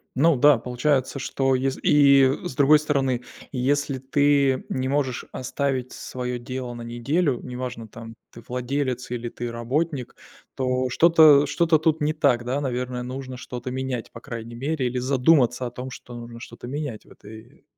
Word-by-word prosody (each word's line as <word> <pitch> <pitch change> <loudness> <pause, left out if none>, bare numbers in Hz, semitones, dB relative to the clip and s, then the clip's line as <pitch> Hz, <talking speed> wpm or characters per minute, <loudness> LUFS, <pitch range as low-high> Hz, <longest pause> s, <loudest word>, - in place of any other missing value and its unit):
Ну 155 +4 +4
да, 145 +1 +6
получается, 130 +3 -1
что 135 0 0
ес 135 +1 -1
и 140 -2 +6
с - - -5
другой 145 +2 +6
стороны, 135 -5 0 0.3
если 140 +1 0
ты 140 0 +2
не 130 0 -2
можешь 135 -3 -1
оставить 130 0 -2
своё 125 -1 -5
дело 125 0 -5
на 120 - -8
неделю, 120 +5 -1
неважно 125 -2 -6
там 115 +1 -11 0.2
ты - - -12
владелец 125 0 -2
или 120 -1 -3
ты 120 0 -5
работник, 130 +4 -2 0.4
то 130 -1 0
что-то, 155 0 +6
э, - - -1
что-то 160 +2 +2
тут 160 0 +1
не 150 +1 +1
так, 140 -6 +2
да, 130 +4 -1
наверное, 125 -2 -3
нужно 130 0 -6
что-то 125 0 -7
менять 130 -2 -4
по 115 - -10
крайней 115 -2 -8
мере 135 +1 -1
или 125 +1 -3
задуматься 125 -1 +2
о - - -8
том, 125 +2 -7
что 120 - -10
нужно 120 0 -9
что-то 115 +1 -10
менять 140 -4 -5
в - - -20
этой 110 +1 -14
130 Hz, 170 wpm, -24 LUFS, 125-140 Hz, 0.4 s, да